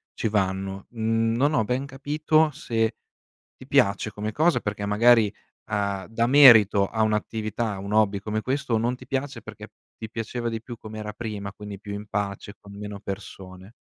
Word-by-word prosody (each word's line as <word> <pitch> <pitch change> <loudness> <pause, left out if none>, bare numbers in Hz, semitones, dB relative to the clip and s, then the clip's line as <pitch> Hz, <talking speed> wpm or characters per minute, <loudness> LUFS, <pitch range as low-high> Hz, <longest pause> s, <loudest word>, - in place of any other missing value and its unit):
ci - - -1
vanno. 95 -1 -2
Non 115 +4 +1
ho 125 - +3
ben 125 +5 -1
capito 150 +3 +1
se: 115 -6 -1 0.6
ti 130 - -13
piace 110 -6 +2
come 105 +2 -4
cosa, 160 +8 +2
perché 100 0 -3
magari, 110 0 +4 0.4
uhm, 100 -2 -1
dà 115 +1 0
merito 115 -8 +7
a 110 +2 -1
un'attività, 110 +1 -1
a - - -7
un 100 +1 -6
hobby 105 -2 +3
come 110 +1 -3
questo, 135 -1 -1
o - - +3
non 120 +3 0
ti 125 0 -13
piace, 135 +1 -3
perché - - -10 0.3
ti 110 - -7
piaceva 115 +2 -4
di 115 -1 -4
più 120 0 -8
come 110 0 -9
era 105 0 -5
prima, 105 -3 -6
quindi 100 -1 -9
più 105 -1 -7
in 105 +1 -7
pace 100 -1 -4
con 100 - -13
meno 105 0 -7
persone. 95 -1 -8
110 Hz, 180 wpm, -25 LUFS, 100-120 Hz, 0.6 s, merito